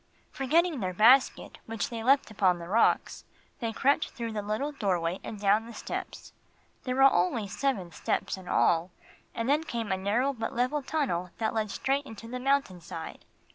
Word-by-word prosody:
Forgetting 315 +3 +1
their 185 -3 -3
basket, 245 +7 +4
which 225 0 -3
they 230 -1 -4
left 270 -1 +3
upon 190 -4 +2
the 170 0 -8
rocks, 220 +5 +2 0.4
they 230 -2 -2
crept 280 +7 +1
through 230 -2 -5
the 215 -1 -3
little 215 +8 -2
doorway 185 - -1
and 215 - -7
down 210 +3 +2
the 235 - -10
steps. - - -6 0.5
There 255 -1 -1
were 270 - +4
only 205 -3 +3
seven 200 -6 -2
steps - - -2
in 190 -2 -12
all, 170 0 +2 0.5
and 230 +1 -2
then 295 +3 +2
came 235 -9 -4
a 190 - +1
narrow 225 +9 +1
but 225 -3 -4
level 255 +5 0
tunnel 260 - -1
that 220 -1 -1
led 220 -1 -1
straight 275 +6 -1
into 225 +1 -10
the 250 +2 -5
mountain 270 -9 0
side. - - -8
225 Hz, 180 wpm, -28 LUFS, 195-270 Hz, 0.5 s, basket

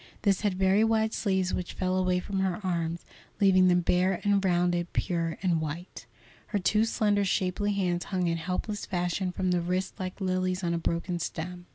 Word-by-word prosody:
This 200 -3 +2
had 205 -3 0
very 190 +3 +3
wide 220 -1 +2
sleeves 190 -3 0
which 180 - -3
fell 185 0 -1
away 185 -1 +2
from 195 +1 -3
her 190 -1 0
arms, 170 -2 -2 0.3
leaving 185 -2 +5
them 180 0 +4
bare 180 +1 +2
and 200 -1 +2
rounded, 175 -1 +1
pure 170 -3 -1
and 170 -4 +2
white. 160 +4 -6 0.4
Her 210 - -1
two 210 +3 +2
slender, 205 -2 +1
shapely 195 +2 0
hands 180 -3 -1
hung 185 -2 -1
in 165 -1 0
helpless 185 +5 -3
fashion 180 0 -1
from 185 0 -1
the 175 -1 +2
wrists 180 +2 -2
like 185 +1 -5
lilies 185 -1 -1
on 170 -1 0
a 170 - 0
broken 170 +1 -2
stem. 175 +2 -5
185 Hz, 190 wpm, -28 LUFS, 175-195 Hz, 0.4 s, leaving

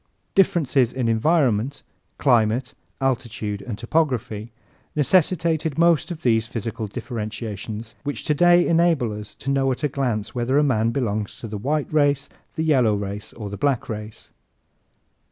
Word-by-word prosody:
Differences 145 -10 +3
in 130 -3 -1
environment 125 0 +1 0.3
climate, 120 -1 +2 0.3
altitude 115 -6 -2
and 115 -5 -6
topography 120 -5 -1 0.4
necessitated 160 -1 +2
most 170 -4 +3
of 170 -3 -7
these 115 -2 +2
physical 115 -1 -4
differentiations 110 0 -5
which 145 0 -4
today 175 +3 +4
enable 165 -9 +2
us 105 -1 -8
to 140 - -3
know 135 -1 +2
at 130 - -4
a - - +4
glance 125 -7 -2
whether 125 +2 0
a 150 - +5
man 115 -5 +2
belongs 110 -5 -2
to 115 - -6
the 105 - -6
white 150 +6 -1
race, 145 -2 +2 0.3
the 160 - -1
yellow 130 -9 +3
race, 100 0 -5
or 105 -3 -7
the 100 - -5
black 140 -5 0
race. 110 -1 -7
125 Hz, 145 wpm, -23 LUFS, 110-145 Hz, 0.4 s, a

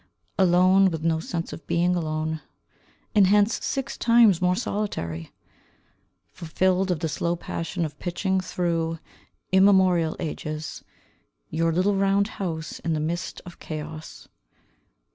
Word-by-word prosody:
Alone, 185 +1 +5
with 160 -3 -5
no 165 -1 +1
sense 165 +1 -4
of - - -10
being 175 +1 +2
alone, 155 -1 -2 0.7
And 205 -4 +5
hence 205 +3 +3
six 270 -1 -3
times 230 -6 +5
more 180 0 +3
solitary; 135 - -3 1.0
Fulfilled 185 +3 0
of 175 -4 -1
the 160 - 0
slow 170 +2 -1
passion 170 0 -3
of 150 -1 -8
pitching 190 +2 -1
through 165 -3 -1 0.5
immemorial 190 -4 +4
ages 155 -1 -5 0.7
Your 165 +1 +1
little 185 +5 +2
round 195 +1 +2
house 165 -3 -4
in 165 - -2
the 155 - -1
midst 170 +3 -3
of 175 - -12
chaos. 155 0 -8
175 Hz, 125 wpm, -25 LUFS, 160-190 Hz, 1.0 s, Alone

